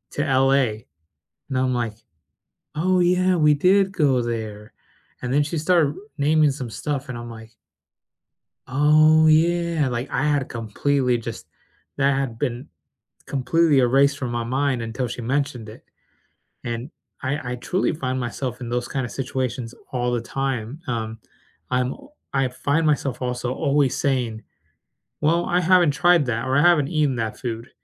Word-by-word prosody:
to 145 Hz, -, 0 dB
LA?" 135 Hz, -1 st, +3 dB, 0.8 s
And 130 Hz, -, -1 dB
I'm 130 Hz, -1 st, +1 dB
like, 115 Hz, -3 st, -2 dB, 0.8 s
"Oh 185 Hz, +4 st, +2 dB
yeah, 180 Hz, +1 st, +3 dB
we 150 Hz, -1 st, +5 dB
did 190 Hz, +5 st, +3 dB
go 135 Hz, -8 st, +2 dB
there." 110 Hz, -3 st, -5 dB, 0.5 s
And 125 Hz, 0 st, -3 dB
then 145 Hz, -, +4 dB
she 150 Hz, +3 st, -3 dB
started 155 Hz, -2 st, +2 dB, 0.2 s
naming 150 Hz, 0 st, +3 dB
some 130 Hz, -4 st, -6 dB
stuff, 140 Hz, +3 st, -4 dB
and 120 Hz, -, -5 dB
I'm 120 Hz, 0 st, -7 dB
like 110 Hz, -1 st, -11 dB, 1.2 s
"Oh, 155 Hz, +3 st, +5 dB
yeah." 165 Hz, -1 st, +3 dB
Like, 120 Hz, +2 st, -3 dB
I 135 Hz, -, -1 dB
had 145 Hz, -3 st, 0 dB
completely 125 Hz, +3 st, 0 dB
just 115 Hz, -6 st, -7 dB, 0.5 s
that 140 Hz, -1 st, +2 dB
had 125 Hz, -5 st, -2 dB
been 125 Hz, -2 st, -3 dB, 0.6 s
completely 145 Hz, +1 st, +2 dB
erased 135 Hz, +3 st, +3 dB
from 125 Hz, -4 st, -3 dB
my 120 Hz, -1 st, -2 dB
mind 130 Hz, 0 st, 0 dB
until 115 Hz, +2 st, -3 dB
she 120 Hz, -, -6 dB
mentioned 130 Hz, -2 st, -2 dB
it. 110 Hz, -, -12 dB, 0.8 s
And 120 Hz, +4 st, -4 dB, 0.3 s
I 130 Hz, -2 st, -2 dB
I -, -, -3 dB
truly 185 Hz, +9 st, -1 dB
find 130 Hz, -5 st, -3 dB
myself 125 Hz, +1 st, -4 dB
in 120 Hz, -, -6 dB
those 120 Hz, 0 st, -2 dB
kinda 130 Hz, -3 st, -2 dB
situations 125 Hz, -2 st, -4 dB, 0.2 s
all 125 Hz, -1 st, -1 dB
the 120 Hz, -, 0 dB
time, 135 Hz, +1 st, -3 dB
um, 110 Hz, -3 st, -3 dB, 0.5 s
I'm, 125 Hz, 0 st, 0 dB
o 280 Hz, +1 st, -17 dB, 0.2 s
I 135 Hz, -2 st, +1 dB
find 145 Hz, +5 st, 0 dB
myself 140 Hz, -4 st, 0 dB
also 125 Hz, 0 st, -2 dB
always 140 Hz, -3 st, +1 dB
saying, 125 Hz, -5 st, -1 dB, 0.8 s
"Well, 165 Hz, +3 st, +2 dB
I 180 Hz, +1 st, +1 dB
haven't 180 Hz, -3 st, +4 dB
tried 175 Hz, 0 st, +4 dB
that," 120 Hz, 0 st, -2 dB
or, 130 Hz, +1 st, +1 dB
"I -, -, +5 dB
haven't 155 Hz, -4 st, +4 dB
eaten 150 Hz, -5 st, +1 dB
that 110 Hz, -2 st, -3 dB
food." 115 Hz, +1 st, -5 dB
135 Hz, 155 wpm, -23 LUFS, 120-150 Hz, 1.2 s, we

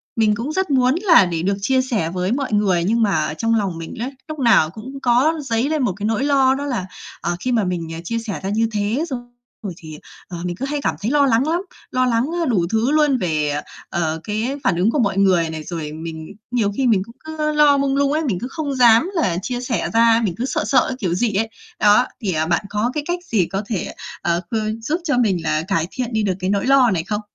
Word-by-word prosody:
mình 215 Hz, -2 st, +3 dB
cũng 235 Hz, +8 st, -4 dB
rất 380 Hz, -1 st, -1 dB
muốn 255 Hz, 0 st, +3 dB
là 335 Hz, -, +6 dB
để 170 Hz, -2 st, -3 dB
được 195 Hz, +2 st, +1 dB
chia 260 Hz, +5 st, +2 dB
sẻ 230 Hz, -, -1 dB
với 180 Hz, +2 st, -2 dB
mọi 260 Hz, -2 st, -1 dB
người, 195 Hz, -5 st, +2 dB
nhưng 225 Hz, +6 st, +1 dB
mà 175 Hz, -7 st, +1 dB
ở -, -, -3 dB
trong 225 Hz, +7 st, 0 dB
lòng 195 Hz, -6 st, -1 dB
mình 165 Hz, 0 st, -7 dB
ấy, 245 Hz, +4 st, -4 dB, 0.2 s
lúc 310 Hz, -2 st, -6 dB
nào 230 Hz, -11 st, +4 dB
cũng 245 Hz, +9 st, -9 dB
có 250 Hz, +6 st, +3 dB
dấy 240 Hz, +1 st, 0 dB
lên 310 Hz, -3 st, 0 dB
một 205 Hz, -, +1 dB
cái 205 Hz, -, -4 dB
nỗi 225 Hz, +3 st, 0 dB
lo 270 Hz, -2 st, +3 dB
đó 285 Hz, +1 st, -4 dB
là, 245 Hz, -10 st, -2 dB, 0.4 s
ờ, 175 Hz, +1 st, -1 dB
khi 255 Hz, -, -2 dB
mà 230 Hz, -3 st, +2 dB
mình, 180 Hz, -3 st, -2 dB
ờ, 165 Hz, -, -6 dB
chia 230 Hz, +6 st, -2 dB
sẻ 225 Hz, -3 st, -5 dB
ra 190 Hz, -, -2 dB
như 225 Hz, +2 st, +1 dB
thế 215 Hz, +7 st, -1 dB
xong 245 Hz, -3 st, -6 dB, 0.3 s
rồi 195 Hz, -4 st, -4 dB
thì, 155 Hz, -3 st, -10 dB, 0.3 s
ờ, 175 Hz, -, -7 dB
mình 175 Hz, -1 st, -3 dB
cứ 255 Hz, -, -4 dB
hay 290 Hz, +1 st, -2 dB
cảm -, -, 0 dB
thấy 220 Hz, +5 st, -1 dB
lo 290 Hz, -1 st, +4 dB
lắng 255 Hz, +2 st, +2 dB
lắm. 335 Hz, +3 st, +1 dB, 0.3 s
Lo 255 Hz, 0 st, +2 dB
lắng, 235 Hz, -1 st, +2 dB, 0.2 s
á, -, -, +1 dB
đủ 190 Hz, -8 st, +2 dB
thứ 225 Hz, +5 st, +1 dB
luôn, 300 Hz, -3 st, +3 dB
về, 155 Hz, -7 st, 0 dB
ờ, 145 Hz, 0 st, -2 dB, 0.3 s
ờ, 160 Hz, -3 st, -1 dB
cái 220 Hz, +6 st, -2 dB
phản 195 Hz, -, +2 dB
ứng 190 Hz, +6 st, +2 dB
của 295 Hz, -, 0 dB
mọi 200 Hz, -5 st, +1 dB
người 185 Hz, -4 st, +3 dB
này, 160 Hz, -1 st, -6 dB
rồi 160 Hz, -2 st, -5 dB
mình 160 Hz, 0 st, -7 dB, 0.2 s
nhiều 225 Hz, -5 st, +1 dB
khi 265 Hz, -, +2 dB
mình 215 Hz, -5 st, +3 dB
cũng 230 Hz, +2 st, -15 dB
cứ 310 Hz, -1 st, -2 dB
lo 295 Hz, -1 st, +5 dB
mông 275 Hz, -1 st, +1 dB
lung 280 Hz, 0 st, +2 dB
ấy, 310 Hz, +2 st, +1 dB
mình 215 Hz, -, -1 dB
cứ 245 Hz, -, -4 dB
không 285 Hz, -2 st, -3 dB
dám 240 Hz, +5 st, +5 dB
là 190 Hz, -, +1 dB
chia 245 Hz, +4 st, -3 dB
sẻ 235 Hz, -7 st, -2 dB
ra, 230 Hz, 0 st, +5 dB
mình 195 Hz, -6 st, 0 dB
cứ 245 Hz, -, -2 dB
sợ 255 Hz, -, -1 dB
sợ 220 Hz, -, +3 dB
cái 260 Hz, -, -3 dB
kiểu 180 Hz, -7 st, -1 dB
gì 215 Hz, +4 st, 0 dB
ấy. 220 Hz, +3 st, 0 dB, 0.3 s
Đó, 210 Hz, +4 st, +5 dB, 0.2 s
thì, 195 Hz, -5 st, -1 dB
à, 155 Hz, 0 st, 0 dB
bạn 170 Hz, +4 st, 0 dB
có 210 Hz, +4 st, 0 dB
cái 300 Hz, -, -2 dB
cách 350 Hz, +1 st, -1 dB
gì 205 Hz, -, +1 dB
có 195 Hz, +3 st, -3 dB
thể, 205 Hz, -4 st, -3 dB, 0.3 s
ờ, 170 Hz, 0 st, 0 dB
khư 220 Hz, -1 st, -2 dB
giúp 310 Hz, +10 st, -2 dB
cho 295 Hz, -7 st, 0 dB
mình 195 Hz, -9 st, +1 dB
là 155 Hz, -1 st, 0 dB
cải 165 Hz, -4 st, 0 dB
thiện 250 Hz, -2 st, -4 dB
đi 220 Hz, -1 st, +1 dB
được 195 Hz, -2 st, +1 dB
cái 185 Hz, 0 st, -2 dB
nỗi 200 Hz, 0 st, 0 dB
lo 270 Hz, -2 st, +5 dB
này 170 Hz, -4 st, 0 dB
không? 210 Hz, +4 st, -3 dB
225 Hz, 265 wpm, -20 LUFS, 185-260 Hz, 0.4 s, là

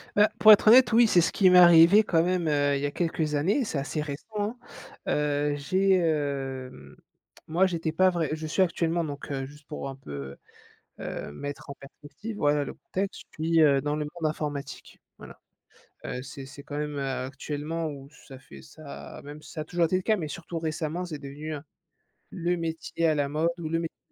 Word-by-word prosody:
Bah, 210 Hz, +1 st, +5 dB
pour 215 Hz, -, +9 dB
être 210 Hz, -, +6 dB
honnête, 235 Hz, 0 st, +8 dB
oui, 235 Hz, 0 st, +6 dB
c'est 175 Hz, -4 st, +5 dB
ce -, -, +1 dB
qui 190 Hz, -2 st, +4 dB
m'est 180 Hz, 0 st, +7 dB
arrivé 175 Hz, +4 st, +8 dB
quand 165 Hz, -4 st, +2 dB
même, 180 Hz, -2 st, 0 dB
heu, 145 Hz, -1 st, +2 dB
il 140 Hz, -, -2 dB
y -, -, -1 dB
a 145 Hz, -, -1 dB
quelques 160 Hz, -3 st, -1 dB
années, 195 Hz, -, +1 dB
c'est 155 Hz, -, -3 dB
assez 145 Hz, +2 st, -2 dB
récent, 145 Hz, -1 st, -6 dB
hein. 210 Hz, +4 st, -2 dB, 0.5 s
Heu, 145 Hz, 0 st, 0 dB
j'ai, 190 Hz, +7 st, +1 dB
hem, 140 Hz, -6 st, -2 dB, 0.5 s
moi 170 Hz, +4 st, +3 dB
j'étais 165 Hz, -3 st, -2 dB
pas 185 Hz, +3 st, +4 dB
vrai 170 Hz, -4 st, -1 dB
je 155 Hz, 0 st, -5 dB
suis 170 Hz, +5 st, 0 dB
actuellement 170 Hz, -1 st, +1 dB
donc 145 Hz, -1 st, -7 dB
heu, 135 Hz, -1 st, -2 dB
juste 145 Hz, +1 st, -15 dB
pour 150 Hz, -2 st, -5 dB
un 135 Hz, -, -7 dB
peu, 70 Hz, -, -8 dB, 0.6 s
heu, -, -, -5 dB
mettre 145 Hz, -, -7 dB
en 140 Hz, -, -4 dB
perspective, 175 Hz, +10 st, -10 dB
voilà 145 Hz, 0 st, +2 dB
le -, -, -6 dB
contexte, 195 Hz, +1 st, -4 dB
je 155 Hz, -, -7 dB
suis, 165 Hz, 0 st, +3 dB
heu, 140 Hz, -3 st, +5 dB
dans 145 Hz, +1 st, -1 dB
le 150 Hz, -1 st, -2 dB
monde 155 Hz, +1 st, -3 dB
informatique, 145 Hz, -2 st, -6 dB, 0.2 s
voilà. -, -, -13 dB, 0.7 s
Heu, 125 Hz, -, -4 dB
c'est 135 Hz, -1 st, -9 dB
c'est 140 Hz, +1 st, -12 dB
quand 145 Hz, -1 st, -6 dB
même, 150 Hz, -1 st, -3 dB
heu, 140 Hz, -, -2 dB, 0.2 s
actuellement 150 Hz, +4 st, -4 dB
où 140 Hz, -2 st, -8 dB, 0.2 s
ça 135 Hz, -2 st, -11 dB
fait 70 Hz, -, -14 dB
ça 70 Hz, +2 st, -11 dB
même 145 Hz, +1 st, -10 dB
si -, -, -13 dB
ça 155 Hz, -, -5 dB
a -, -, -3 dB
toujours 175 Hz, +1 st, +1 dB
été 175 Hz, +3 st, 0 dB
le -, -, -2 dB
cas, 220 Hz, +1 st, +2 dB
mais 160 Hz, -5 st, -4 dB
surtout 165 Hz, +2 st, -6 dB
récemment, 160 Hz, +2 st, -3 dB
c'est 155 Hz, -4 st, -6 dB
devenu, 145 Hz, +3 st, -7 dB
heu, 145 Hz, -, -7 dB, 0.7 s
le 175 Hz, 0 st, -1 dB
métier 165 Hz, 0 st, -2 dB
à 155 Hz, -, +3 dB
la 145 Hz, -1 st, 0 dB
mode 155 Hz, +4 st, 0 dB
ou 165 Hz, -2 st, -4 dB
le 165 Hz, +1 st, 0 dB
métier 165 Hz, -1 st, -5 dB
155 Hz, 215 wpm, -27 LUFS, 145-175 Hz, 0.7 s, pour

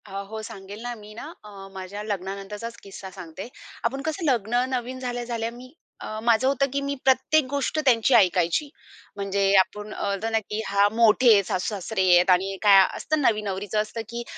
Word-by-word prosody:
अ, 205 Hz, -, -14 dB, 0.2 s
हो 220 Hz, 0 st, -6 dB
सांगेल 200 Hz, +1 st, -9 dB
ना. 245 Hz, 0 st, -4 dB
मी 210 Hz, -1 st, -13 dB
ना 230 Hz, -, -8 dB, 0.2 s
अ, 210 Hz, -, -12 dB, 0.2 s
माझ्या 190 Hz, +2 st, -7 dB
लग्नानंतरचाच 205 Hz, +3 st, -5 dB
किस्सा 195 Hz, -1 st, -9 dB
सांगते. 170 Hz, +5 st, -8 dB, 0.4 s
आपण 270 Hz, +4 st, -1 dB
कसं 320 Hz, +3 st, -3 dB
लग्न 245 Hz, -2 st, +1 dB
नवीन 255 Hz, 0 st, -3 dB
झाल्या-झाल्या 240 Hz, -2 st, -3 dB
मी 250 Hz, +3 st, -13 dB, 0.3 s
अ, 215 Hz, -, -5 dB
माझं 235 Hz, +2 st, +3 dB
होतं 275 Hz, 0 st, +2 dB
की 280 Hz, -, 0 dB
मी 280 Hz, 0 st, -2 dB
प्रत्येक 265 Hz, +4 st, +3 dB
गोष्ट 280 Hz, +2 st, -2 dB
त्यांची 245 Hz, 0 st, +4 dB
ऐकायची. 185 Hz, -, +3 dB, 0.5 s
म्हणजे 200 Hz, 0 st, -2 dB, 0.2 s
आपण 210 Hz, +2 st, +1 dB
बोलताना 220 Hz, +3 st, -1 dB
की 215 Hz, 0 st, -5 dB
"हां, 200 Hz, +1 st, +3 dB
मोठे 230 Hz, +1 st, +5 dB
आहेत, 200 Hz, -1 st, +4 dB
सासू-सासरे 195 Hz, +2 st, -2 dB
आहेत" 175 Hz, +2 st, +4 dB
आणि 195 Hz, +2 st, -3 dB
काय 200 Hz, -2 st, +7 dB, 0.2 s
असतं 310 Hz, -1 st, -1 dB
नवीन 215 Hz, -5 st, +1 dB
नवरीचं 200 Hz, +2 st, -2 dB
असतं 215 Hz, +2 st, -5 dB
की 235 Hz, 0 st, -5 dB
220 Hz, 175 wpm, -24 LUFS, 200-245 Hz, 0.5 s, काय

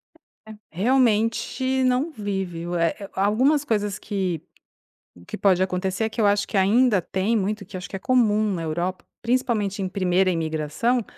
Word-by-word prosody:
É, 325 Hz, -, -31 dB, 0.4 s
realmente 230 Hz, -, +1 dB
não 255 Hz, +6 st, +1 dB
vive. 190 Hz, -, -4 dB
Eh 165 Hz, -1 st, +1 dB
eh, -, -, -13 dB
a 195 Hz, -, +1 dB
algumas 265 Hz, +8 st, +3 dB
coisas 210 Hz, -4 st, -1 dB
que 185 Hz, -6 st, -2 dB, 0.9 s
que -, -, -5 dB
pode 185 Hz, -1 st, +3 dB
acontecer, 190 Hz, +2 st, -2 dB
é -, -, -1 dB
que 220 Hz, +1 st, -3 dB
eu 210 Hz, -, +4 dB
acho 205 Hz, 0 st, +2 dB
que -, -, -6 dB
ainda 210 Hz, +2 st, +4 dB
tem 190 Hz, +7 st, -1 dB
muito, 205 Hz, 0 st, -1 dB
que 185 Hz, -, -12 dB
acho 185 Hz, -, -8 dB
que -, -, -6 dB
é 195 Hz, -, -4 dB
comum 215 Hz, -4 st, +2 dB
na 170 Hz, -, -3 dB
Europa, 175 Hz, +4 st, -3 dB, 0.2 s
principalmente 230 Hz, -5 st, 0 dB
em 190 Hz, -, -2 dB
primeira 185 Hz, -1 st, +1 dB
imigração, 165 Hz, +8 st, -1 dB
205 Hz, 170 wpm, -23 LUFS, 185-230 Hz, 0.9 s, eu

